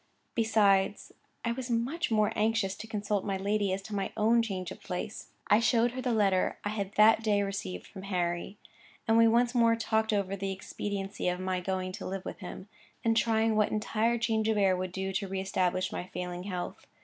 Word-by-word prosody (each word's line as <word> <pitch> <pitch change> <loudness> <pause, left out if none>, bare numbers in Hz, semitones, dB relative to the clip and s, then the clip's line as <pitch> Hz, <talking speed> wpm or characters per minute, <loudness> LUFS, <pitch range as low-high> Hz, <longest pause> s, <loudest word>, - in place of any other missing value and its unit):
Besides, 205 -3 +2 0.3
I 235 - +1
was 250 +1 -4
much 260 +9 0
more 215 -2 +2
anxious 215 -3 +1
to 220 +2 -9
consult 205 -2 -1
my 195 -2 -1
lady 200 0 0
as 195 +1 -2
to 215 - -8
my 195 -1 -2
own 230 +2 +4
change 190 -5 -4
of - - -9
place. 200 +3 -5 0.2
I 210 - +5
showed 235 0 +3
her 255 +1 -5
the 250 -1 0
letter 200 -4 +2
I 205 - -1
had 200 -2 -3
that 220 +1 +6
day 205 -2 +2
received 145 - -4
from 190 - -10
Harry; 175 +1 -1 0.5
and 225 - +4
we 230 0 +7
once 240 +2 +3
more 230 -2 +4
talked 220 -1 0
over 200 -2 0
the 195 0 -3
expediency 195 +1 -4
of 180 0 0
my 185 0 -1
going 185 0 -2
to - - -6
live 190 0 -5
with - - -6
him, 185 0 -8 0.4
and 225 0 +3
trying 225 0 +2
what 210 -1 +3
entire 220 +2 0
change 225 -2 0
of 220 - +2
air 195 -2 +4
would 185 0 -3
do 190 +1 -3
to 195 +1 -1
re 190 0 -3
establish 185 -1 0
my 180 - -4
failing 180 0 -5
health. 180 -3 -5
205 Hz, 210 wpm, -30 LUFS, 190-225 Hz, 0.5 s, we